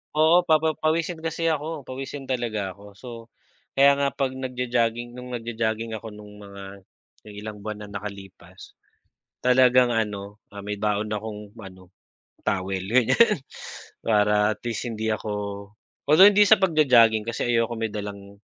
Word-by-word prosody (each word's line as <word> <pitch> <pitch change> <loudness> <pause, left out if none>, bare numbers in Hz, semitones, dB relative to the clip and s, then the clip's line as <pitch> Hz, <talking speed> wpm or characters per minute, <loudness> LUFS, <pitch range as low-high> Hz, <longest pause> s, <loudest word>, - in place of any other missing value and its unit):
Oo, 165 +3 +4
papa 160 0 +3
pawisin 160 +2 0
kasi 165 0 -1
ako 155 0 -4
pawisin 135 +2 -7
talaga 115 -7 -3
ako. 100 +1 -15
So, 125 - -13 0.7
kaya 140 +1 +5
nga 140 - +2
'pag 135 -2 -1
nag-jo-jogging 120 -2 -2
no'ng 125 0 -7
nag-jo-jogging 115 -1 -3
ako 110 0 -6
nong 105 -1 -12
mga 100 -1 -11 0.7
ilang 105 0 -8
buwan 105 0 -6
na 105 - -9
nakalipas. 95 -3 -10 0.6
Talagang 125 -1 +4
ano, 105 -2 -3
ah, 100 - -11
may 105 +1 -4
baon 105 0 -1
akong 105 0 -7
ano 95 -1 -14 0.5
towel 95 -2 -2
ganyan 130 - +4 0.6
para 105 -1 +2
at - - -43
least 120 +1 -3
hindi 110 -1 -2
ako 110 0 -5 0.8
although 170 +6 +8
hindi 205 0 +5
sa - - +8
pag-jo-jogging 125 - +4
kasi 115 - -2
ayoko 115 0 +1
may 110 -1 -3
dalang 100 -1 -7
115 Hz, 145 wpm, -24 LUFS, 105-130 Hz, 0.8 s, although